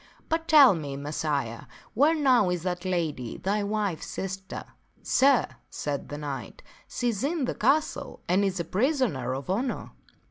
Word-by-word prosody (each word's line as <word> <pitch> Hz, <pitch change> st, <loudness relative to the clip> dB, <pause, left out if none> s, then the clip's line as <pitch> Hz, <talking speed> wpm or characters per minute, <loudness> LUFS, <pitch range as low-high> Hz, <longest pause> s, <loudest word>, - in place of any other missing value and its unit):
But 325 Hz, 0 st, -1 dB
tell 290 Hz, -8 st, +8 dB
me, 145 Hz, -5 st, -4 dB
Messire, 140 Hz, -5 st, -3 dB, 0.3 s
where 295 Hz, +7 st, +4 dB
now 255 Hz, -, +4 dB
is 175 Hz, -2 st, -2 dB
that 180 Hz, 0 st, -3 dB
lady, 160 Hz, -10 st, -2 dB
thy 205 Hz, +2 st, 0 dB
wife's 205 Hz, -4 st, -2 dB
sister? 190 Hz, 0 st, -5 dB
" -, -, -40 dB
" -, -, -34 dB
Sir," 270 Hz, -2 st, +4 dB, 0.2 s
said 145 Hz, -2 st, -4 dB
the 145 Hz, -, -5 dB
knight, 140 Hz, -8 st, -6 dB
" -, -, -28 dB
she 245 Hz, -, -1 dB
is 215 Hz, -1 st, -2 dB
in 300 Hz, -1 st, 0 dB
this -, -, -3 dB
castle 285 Hz, +3 st, +1 dB
and 185 Hz, +3 st, +3 dB
is 195 Hz, -2 st, 0 dB
a 170 Hz, -, -2 dB
prisoner 205 Hz, -, 0 dB
of 135 Hz, 0 st, -6 dB
honor." 235 Hz, +8 st, -2 dB
190 Hz, 175 wpm, -27 LUFS, -, 0.3 s, tell